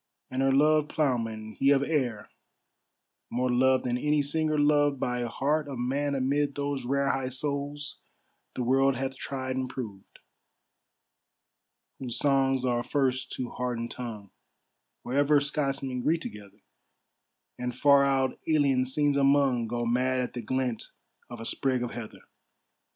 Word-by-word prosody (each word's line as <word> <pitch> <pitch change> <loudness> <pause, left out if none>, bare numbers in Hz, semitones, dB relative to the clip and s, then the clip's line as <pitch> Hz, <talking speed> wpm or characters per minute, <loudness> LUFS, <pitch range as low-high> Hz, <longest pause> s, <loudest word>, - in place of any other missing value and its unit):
And 130 - -1
her 135 0 +3
loved 150 +2 +4
ploughman, 115 -7 -1
he 135 - +4
of 140 -1 +4
Ayr, 130 -8 -1 1.0
More 125 +1 0
loved 130 +1 +3
than 125 0 -1
any 150 +1 +2
singer 155 +1 0
loved 145 -1 +3
By 125 -1 -1
heart 145 +6 0
of 135 -3 -5
man 140 +4 -1
amid 140 +2 0
those 140 -2 -2
rare, 140 +2 +1
High 135 -1 -2
souls 145 +2 -4 0.6
the 125 - -2
world 135 +2 +3
hath 135 +1 -3
tried 130 -1 -4
and 130 -1 -2
proved; 110 -7 -8 1.8
Whose 125 -3 -3
songs 135 -2 +2
are 120 -1 +1
first 130 -1 0
to 125 -2 -4
heart 125 -1 -3
and 115 0 -4
tongue, 110 -5 -7 0.7
Wherever 145 +3 +3
Scotsmen 135 -3 -2
greet 165 +5 +1
together, 105 -5 -10 1.0
And, 125 0 -4
far 140 0 +6
out 135 -1 +1
alien 140 -5 +3
scenes 145 +1 +1
among, 135 -4 +3
Go 120 +1 -2
mad 130 +2 +1
at 125 - -4
the 120 - -4
glint 125 0 -2 0.4
of 120 - -8
a 115 - -6
sprig 130 -1 0
of 120 - -4
heather. 115 -3 -8
130 Hz, 145 wpm, -28 LUFS, 125-140 Hz, 1.8 s, far